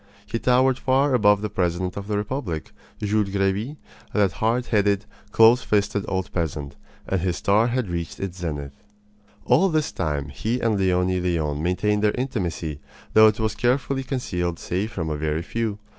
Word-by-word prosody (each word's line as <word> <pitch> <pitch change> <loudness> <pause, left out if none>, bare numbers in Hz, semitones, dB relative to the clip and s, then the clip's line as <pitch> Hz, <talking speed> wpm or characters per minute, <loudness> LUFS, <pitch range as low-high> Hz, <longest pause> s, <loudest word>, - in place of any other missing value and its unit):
He 115 +2 -3
towered 130 +1 +3
far 135 +2 +2
above 105 -3 +4
the 105 - -1
president 90 -1 -1
of 100 0 -6
the 105 -1 -1
republic 105 - -3 0.3
Jules 105 -1 +1
Grevy, 100 +8 -1 0.4
that 100 -3 +3
hard 115 +5 0
headed, 100 -2 +1 0.3
close 115 +3 +6
fisted 100 -2 0
old 95 -1 -3
peasant 75 -4 -3 0.3
and 95 -2 0
his 90 -1 -1
star 105 +4 +3
had 125 -2 -1
reached 85 -1 -4
its 95 -2 -5
zenith. 75 -5 -4 0.7
All 150 +11 +4
this 155 -3 0
time 75 -3 -2
he 110 - -2
and 110 -4 +1
Leonie 90 -1 +2
Leon 80 -5 -1
maintained 105 +5 +1
their 105 - +3
intimacy, 90 - -3 0.3
though 110 0 +8
it 110 0 +1
was 110 -1 0
carefully 135 +4 0
concealed 90 -11 -2
save 95 +7 -3
from 80 -6 -3
a - - -1
very 80 +2 -1
few. 110 +1 -2
100 Hz, 170 wpm, -24 LUFS, 90-115 Hz, 0.7 s, though